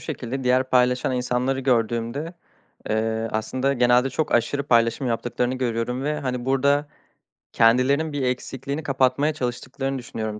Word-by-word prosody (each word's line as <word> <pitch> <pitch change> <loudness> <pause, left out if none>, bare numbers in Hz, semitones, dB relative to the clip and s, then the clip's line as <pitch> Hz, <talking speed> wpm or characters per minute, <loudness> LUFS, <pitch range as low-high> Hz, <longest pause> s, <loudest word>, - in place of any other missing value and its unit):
şekilde; 135 -3 -5
diğer 130 +1 +2
paylaşan 125 0 +2
insanları 125 +2 -1
gördüğümde, 120 +5 -1 0.5
eee, 110 +1 -1
aslında 130 +5 -1
genelde 125 0 +3
çok 155 +4 -2
aşırı 140 +4 0
paylaşım 115 +1 +2
yaptıklarını 120 +1 -1
görüyorum 125 0 -2
ve, 150 0 -1
hani, 125 -3 -3
burada 140 +2 +2 0.6
kendilerinin 130 +7 +3
bir 145 - -2
eksikliğini 135 +3 -3
kapatmaya 135 +1 +1
çalıştıklarını 135 +1 -3
düşünüyorum 110 -3 -5
130 Hz, 125 wpm, -23 LUFS, 120-135 Hz, 0.6 s, genelde